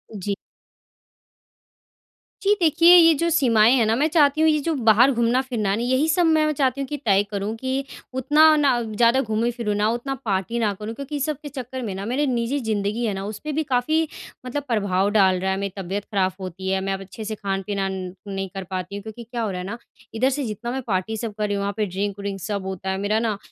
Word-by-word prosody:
जी। 200 0 -3 2.1
जी, 405 +1 +4
देखिए, 335 +2 +6
ये 330 -2 +8
जो 335 +4 0
सीमाएँ 240 -7 +4
हैं 230 - +3
ना 220 - +2
मैं 290 +6 +2
चाहती 300 -1 +3
हूँ 320 - +5
ये 305 -1 +2
जो 330 +2 -1
बाहर 240 +1 +5
घूमना-फिरना 235 -2 0
है 195 - +2
ना, 235 - -2
यही 260 +5 +2
सब 345 +3 +3
मैं 310 -1 +3
चाहती 275 -1 0
हूँ 270 - -3
कि 295 - -4
तय 200 -1 +4
करूँ 205 +2 -2
कि 265 +3 -2 0.3
उतना 305 +4 +5
ना, 270 -5 +2
ज़्यादा 230 +3 +2
घूमूँ 225 0 0
फिरूँ 230 -3 -2
ना, 210 +1 +2
उतना 240 +4 -2
पार्टी 205 +3 -1
ना 210 -3 +1
करूँ 215 +3 -6
क्योंकि 280 +3 -6
ये - - -2
सब 300 0 -1
के 290 - -7
चक्कर 260 -1 -6
में 210 -5 -4
ना 195 +1 -5
मेरी 260 +6 0
निजी 250 +2 0
ज़िंदगी 220 0 -1
है 210 - 0
ना, 195 0 -5
उसपे 215 +9 -5
भी 310 +2 0
काफ़ी 300 +4 +1 0.4
मतलब 285 +3 -3
प्रभाव 200 -4 +1
डाल 190 -3 +4
रहा 190 +1 -1
है। 190 - -1
मेरी 200 -1 -3
तबीयत 195 +2 -4
ख़राब 190 -3 0
होती 190 0 -5
है, 190 0 +1
मैं 195 0 -1
अब 195 - -5
अच्छे 195 +3 -9
से 215 0 -3
खान-पीना 195 0 -2
न 185 -1 -5
नहीं 195 -1 -3
कर 195 - -4
पाती 185 +1 -4
हूँ, 200 - -6
क्योंकि 220 +2 -9
क्या 235 +1 -5
हो 215 - -1
रहा 180 - -4
है - - -6
ना? 230 - -5 0.4
इधर 255 +4 +2
से 280 +1 -2
जितना 225 +2 -4
मैं 265 +1 -3
पार्टी 205 +3 -1
सब 225 -1 -4
कर 210 - +1
रही 205 - -1
हूँ, 200 - -2
वहाँ 200 0 -2
पे 215 - +1
ड्रिंक 200 +2 -3
व्रिंक 200 -1 -4
सब 200 +1 -3
होता 190 0 -4
है। 190 - -1
मेरा 205 +2 0
ना 225 -3 -1
225 Hz, 240 wpm, -23 LUFS, 200-265 Hz, 2.1 s, ये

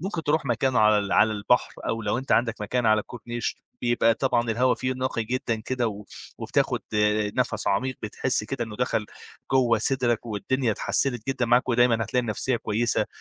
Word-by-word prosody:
ممكن 175 -2 -3
تروح 155 0 +1
مكان 130 0 0
على 105 -3 +3
على 110 - +5
البحر، 105 +4 +1 0.2
أو 115 0 -2
لو 105 +2 0
أنت 130 - -2
عندّك 115 -2 +1
مكان 115 +3 -1
على 110 0 +4
الكورنيش، 120 +1 -5 0.3
يبقى 120 -1 +3
طبعًا 120 -3 0
الهوا 125 +3 +2
فيه 130 0 -2
نقي 130 -3 -2
جدًا 120 -1 -2
كده 125 0 -1
و 105 -1 -8 0.3
وبتاخد - - 0
آآ 105 0 +2
نفس 115 -4 -1
عميق 130 +7 0
بتحِسّ 110 +2 -1
كده 120 +2 -3
إنه 110 -2 -9
دخّل 115 -3 -1 0.5
جوا 120 -4 +3
صِدرَك، 120 0 0
والدنيا 115 +4 -1
اتحسّنت 120 +1 0
جدًا 130 -2 0
معاك 120 +2 +3
ودايمًا 120 -1 +4
هتلاقي 125 +3 0
النفسية 120 +3 -1
كويسة، 115 +1 0
120 Hz, 175 wpm, -25 LUFS, 110-130 Hz, 0.5 s, على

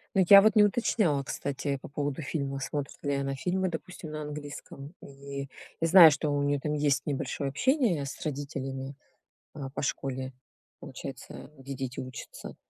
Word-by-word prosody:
Ну, 190 - +5
я 200 -1 +11
вот 220 +1 +4
не 210 - +8
уточняла, 200 - +2
кстати, 140 0 -3
по - - -8
поводу 145 +1 -3
фильмов, 140 -2 -3
смотрит 145 +1 -4
ли 145 -1 0
она 135 0 -1
фильмы, 185 +6 0
допустим, 165 -1 -7
на 155 - -5
английском. 145 0 -8
И, 140 0 -7 0.3
я 165 - +3
знаю, 170 -3 +10
что 145 +1 -1
у 145 0 +1
нее 145 0 +1
там 150 +2 -2
есть 145 -2 +1
небольшое 140 0 -2
общение 220 - +1
с 140 - -7
родителями, 135 -2 -4 0.6
а, 140 -3 -6
по 135 - -5
школе, 130 -2 -2 0.5
получается, - - -9
где 135 +1 -7
дети 130 -1 -5
учатся, 130 0 -8
145 Hz, 165 wpm, -29 LUFS, 135-155 Hz, 0.6 s, я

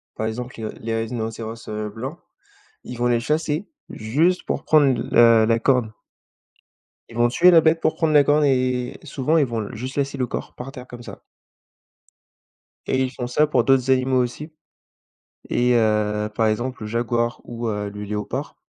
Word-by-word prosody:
par 110 - -2
exemple 120 +3 -5
les 110 - -4
r - - -5
les 115 0 -2
rhinocéros, 115 0 -5
heu, 105 0 -4
blancs, 130 +10 -7 0.6
ils 125 - -8
vont 120 0 +1
les 120 -1 +2
chasser 155 - -1 0.2
juste 155 +12 0
pour 140 - -3
prendre 140 -6 +4
la 115 -1 +6
la 115 +1 +2
corne. 120 -3 +1 1.2
Ils 115 - -11
vont 120 0 +3
tuer 175 +9 +5
la 165 -2 +7
bête 160 +1 +2
pour - - +1
prendre 160 -2 +1
la 145 -1 +7
corne 150 +2 +3
et 125 -2 0
et - - -15
souvent, 150 +2 0
ils 155 - +4
vont 115 -3 -3
l - - -10
juste 130 +4 -6
laisser 140 0 -1
le 130 -2 -1
corps - - -6
par 135 +2 -8
terre 125 -2 -10
comme 120 -1 -10
ça. - - -10 1.7
Et 130 - +1
ils 130 - -1
font 125 -2 -5
ça 150 +5 +2
pour 150 - +1
d'autres 135 -1 +3
animaux 130 0 +2
aussi 145 +6 -6 1.0
et 125 0 +2
heu, 105 -2 +1
par 110 +1 +1
exemple, 120 +3 -3
le - - -4
jaguar 120 +1 -1
ou 120 -1 -5
heu, 105 -1 -3
le 105 +1 -8
léopard. 105 0 -4
125 Hz, 190 wpm, -22 LUFS, 115-135 Hz, 1.7 s, la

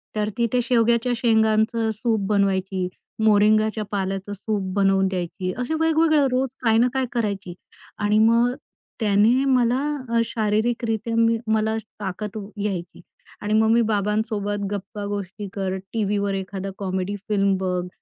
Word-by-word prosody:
तर 210 0 0
ती 235 0 +2
ते 250 - +3
शेवग्याच्या 235 0 +2
शेंगाचं 220 0 +2
सूप 220 -2 -1
बनवायची. 190 -2 +1 0.4
मोरिंगाच्या 215 +1 +3
पाल्याचं 195 0 -3
सूप 200 -1 -3
बनवून 195 -1 +3
द्यायची. 185 0 -3
असे 250 +6 -2
वेगवेगळं 320 -2 +3
रोज 255 +1 +1
काय 225 -1 +4
ना 240 +2 +4
काय 265 -1 0
करायची 200 -6 -2 0.5
आणि 210 +1 +2
मग 230 +2 +4 0.5
त्याने 220 +5 +3
मला 250 -2 +3 0.4
अ, - - +4
शारीरिकरीत्या 225 +1 -1
मी 230 0 +3 0.2
मला 220 0 +1 0.2
ताकत 205 +2 -5 0.3
यायची 185 -5 -4 0.4
आणि 210 +1 -1
मग 220 0 +4
मी 235 +1 +4
बाबांसोबत 205 0 -1
गप्पा 205 +1 -5
गोष्टी 205 0 -5
करत, 190 -1 -2
टीव्हीवर 205 -2 0
एखादा 195 0 -4
कॉमेडी 190 0 -2
फिल्म 200 -2 +2
बघ, 180 -1 -2
210 Hz, 135 wpm, -23 LUFS, 195-230 Hz, 0.5 s, काय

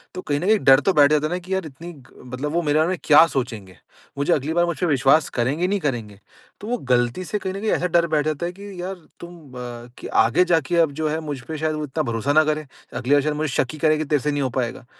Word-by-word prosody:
तो 185 - -5
कहीं 145 -4 -2
न 175 - -4
कहीं 215 0 +4
डर 135 -4 +6
तो 190 +5 +1
बैठ 145 -1 +5
जाता 150 0 +2
है 155 - -7
ना 180 - -2
की 185 +2 -6
यार 190 -2 -1
इतनी 155 +4 -9
ग 135 -4 -19 0.2
मतलब 145 +4 -3
वो 175 - +1
मेरे 150 -1 +1
बारे 160 - +2
में 185 - -1
क्या 155 +2 +7
सोचेंगे? 110 - -5 0.4
मुझे 145 +5 +2
अगली 150 +2 -1
बार 175 +1 +3
मुझपे 170 -1 -2
विश्वास 140 +1 +3
करेंगे 140 +9 -1
नहीं 200 +1 0
करेंगे? 115 - -4 0.4
तो 210 - -7
वो 245 - -1
गलती 125 - 0
से 195 +6 -2
कहीं 190 -1 -4
न 195 - -5
कहीं 220 - -1
ऐसा 180 - +1
डर 170 0 +2
बैठ 155 -2 0
जाता 155 +1 -2
है 175 - -3
कि 195 -1 -9
यार 190 +2 -4 0.2
तुम 170 -6 -12
अ, 120 0 -9
आगे 120 +11 +4
जाके 170 -1 +1
अब 165 -3 +3
जो 155 - 0
है 155 +1 -2
मुझ 145 -3 -5
पे 160 - -5
शायद 155 0 -1
वो 155 - -4
इतना 150 +2 -2
भरोसा 120 +2 -1
ना 155 +1 +6
करे। 155 0 -1 0.3
अगली 135 +2 0
बार 145 - +5
शायद 150 -1 -1
मुझे 155 +1 -1
शक 125 - +1
ही - - -8
करेगी 155 0 +2
तेरे 145 0 +1
से 150 +2 -1
नहीं 145 - -1
हो 130 - 0
पाएगा, 120 0 -3
155 Hz, 280 wpm, -22 LUFS, 135-175 Hz, 0.4 s, क्या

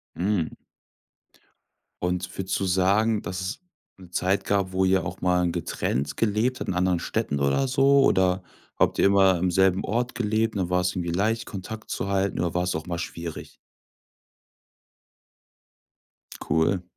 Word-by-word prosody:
Mhm. 90 -2 -1 1.5
Und 90 0 -2
würdest 95 -1 -2
du 95 - -1
sagen, 100 +4 +2
dass 90 +2 -5
es 95 +6 -4 0.4
'ne 95 -2 -14
Zeit 95 +2 0
gab, 100 -2 0
wo 95 0 +1
ihr 95 -2 +2
auch - - -6
mal 90 -1 +2
getrennt 70 -4 -2
gelebt 115 +4 +1
habt, - - -5
in - - 0
anderen 90 -1 +1
Städten 90 -5 -2
oder 70 - +1
so 135 +1 +4
oder 95 -4 +2 0.3
habt - - +2
ihr - - +4
immer 95 -2 +5
im 90 +1 0
selben 95 +1 +2
Ort 120 +4 -1
gelebt 110 0 0
und 100 - 0
dann 90 - -4
war's 90 0 +1
irgendwie 85 -2 -2
leicht 110 +6 0
Kontakt 110 +3 -8
zu 100 - -3
halten 100 0 0
oder 85 0 -1
war's 90 0 0
auch 80 +1 -5
mal 85 -1 -3
schwierig? 85 -1 -7 2.9
Cool. 80 +5 +1
95 Hz, 155 wpm, -25 LUFS, 90-105 Hz, 2.9 s, immer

